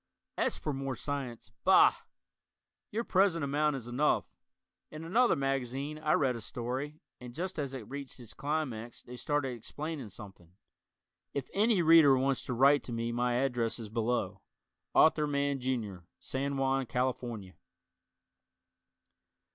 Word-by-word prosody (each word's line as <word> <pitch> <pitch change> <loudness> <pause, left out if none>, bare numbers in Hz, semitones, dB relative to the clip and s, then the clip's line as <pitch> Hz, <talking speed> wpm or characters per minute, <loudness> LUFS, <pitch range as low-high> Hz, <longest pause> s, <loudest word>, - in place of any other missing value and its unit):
As - - 0
for 150 - -3
more 135 -1 -3
science, 135 -3 -5
bah! - - +7 1.0
your 225 +3 -2
present 185 -6 +2
amount 145 +1 +1
is 130 -4 -6
enough. 125 +5 +1 0.6
In 155 +1 -8
another 225 +8 +3
magazine 135 +1 -2
I 155 0 +1
read 130 -3 +2
a 115 - -6
story 130 +7 -4 0.2
and 125 -1 -10
just 180 0 -4
as 135 -2 -3
it 115 -6 -7
reached 140 -1 -7
its 115 -3 -12
climax 135 -6 -3
they 125 - -10
started 145 +1 -1
explaining 140 +3 -6
something! 95 -3 -13 0.8
If 140 -2 -3
any 210 -3 +3
Reader 160 -4 +7
wants 135 0 0
to 125 - -2
write 140 +4 +5
to - - -6
me 115 0 -2
my 120 +1 0
address 125 -3 0
is 115 -3 -7
below. 115 +2 -1 0.5
Arthur 155 -1 +5
Mann, 140 -1 0
Jr., 120 -7 -2 0.2
San 140 +1 -2
Juan, 135 -1 +1
California. 120 -6 -2
135 Hz, 140 wpm, -31 LUFS, 120-150 Hz, 1.0 s, bah